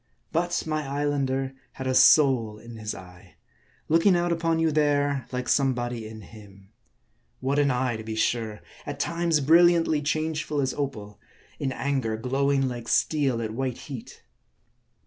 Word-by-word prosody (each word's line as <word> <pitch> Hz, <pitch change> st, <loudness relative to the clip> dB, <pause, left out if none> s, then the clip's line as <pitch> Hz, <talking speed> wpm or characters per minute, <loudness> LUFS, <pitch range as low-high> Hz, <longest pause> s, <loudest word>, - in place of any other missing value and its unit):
But 175 Hz, +1 st, 0 dB
my 155 Hz, -1 st, -1 dB
Islander 135 Hz, -2 st, -1 dB, 0.2 s
had 130 Hz, -, -7 dB
a 130 Hz, -, 0 dB
soul 130 Hz, -7 st, +5 dB
in 115 Hz, +1 st, -11 dB
his 110 Hz, -1 st, -5 dB
eye; 90 Hz, -1 st, -14 dB, 0.5 s
looking 165 Hz, +4 st, +4 dB
out 175 Hz, 0 st, +1 dB
upon 165 Hz, -1 st, +1 dB
you 165 Hz, -1 st, +2 dB
there, 145 Hz, -3 st, +1 dB
like 125 Hz, -1 st, -3 dB
somebody 120 Hz, -5 st, 0 dB
in 110 Hz, 0 st, -10 dB
him. 100 Hz, -2 st, -15 dB, 0.7 s
What 135 Hz, +2 st, 0 dB
an 145 Hz, -1 st, +3 dB
eye, 125 Hz, -2 st, 0 dB
to 110 Hz, -, -8 dB
be 110 Hz, 0 st, -5 dB
sure! 110 Hz, -2 st, -1 dB, 0.3 s
At -, -, -5 dB
times, 170 Hz, -2 st, +1 dB
brilliantly 165 Hz, 0 st, +4 dB
changeful 155 Hz, 0 st, -1 dB
as 135 Hz, -2 st, 0 dB
opal; 110 Hz, -8 st, -5 dB, 0.4 s
in 135 Hz, -, -1 dB
anger, 130 Hz, -5 st, -1 dB
glowing 135 Hz, +3 st, +1 dB
like 120 Hz, -2 st, -6 dB
steel 135 Hz, -6 st, +1 dB
at 110 Hz, -1 st, -4 dB
white 130 Hz, 0 st, -2 dB
heat. 130 Hz, -6 st, -9 dB
135 Hz, 150 wpm, -26 LUFS, 115-150 Hz, 0.7 s, soul